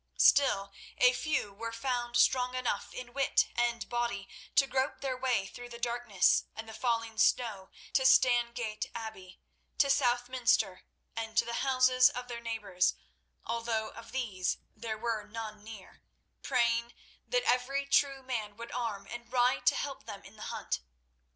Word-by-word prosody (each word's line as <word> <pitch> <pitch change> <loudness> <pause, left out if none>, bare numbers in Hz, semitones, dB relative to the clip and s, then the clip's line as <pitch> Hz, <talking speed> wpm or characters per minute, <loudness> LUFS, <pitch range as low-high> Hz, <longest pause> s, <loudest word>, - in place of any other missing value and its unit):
Still, 200 -8 +4 0.3
a 250 0 +6
few 260 -7 -1
were 230 +3 -5
found 240 0 -1
strong 250 -1 +3
enough 255 -1 -2
in 245 -1 -8
wit 275 0 +2
and 240 -1 0
body 240 -4 -2 0.3
to 275 - +6
grope 270 +1 -1
their 265 -2 -1
way 250 -6 0
through 245 +5 -9
the 235 - -8
darkness 235 -5 +2
and 220 0 -7
the 220 - -9
falling 230 -1 -1
snow 210 -6 +2 0.2
to 285 - +4
Stangate 240 -4 +3
Abbey, 220 -5 -8 0.4
to 280 -1 +4
Southminster, 245 -6 +1 0.3
and 225 0 -5
to - - +5
the 235 0 -2
houses 255 -1 +5
of 250 0 -6
their 235 -1 -5
neighbours, 210 -6 0 0.5
although 230 -1 -1
of 230 - -12
these 210 -9 -1 0.2
there 220 -2 -4
were 220 -2 -2
none 215 -1 -7
near, 215 -3 -12 0.4
praying 235 -2 +1 0.3
that - - +1
every 270 +3 +1
true 275 -1 +2
man 220 -5 -4
would 235 0 -8
arm 220 -5 -3
and 240 +1 -8
ride 250 0 +2
to - - +6
help 275 -1 -4
them 205 -3 -8
in 195 - -14
the 215 - -14
hunt. - - -3
235 Hz, 155 wpm, -31 LUFS, 220-255 Hz, 0.5 s, a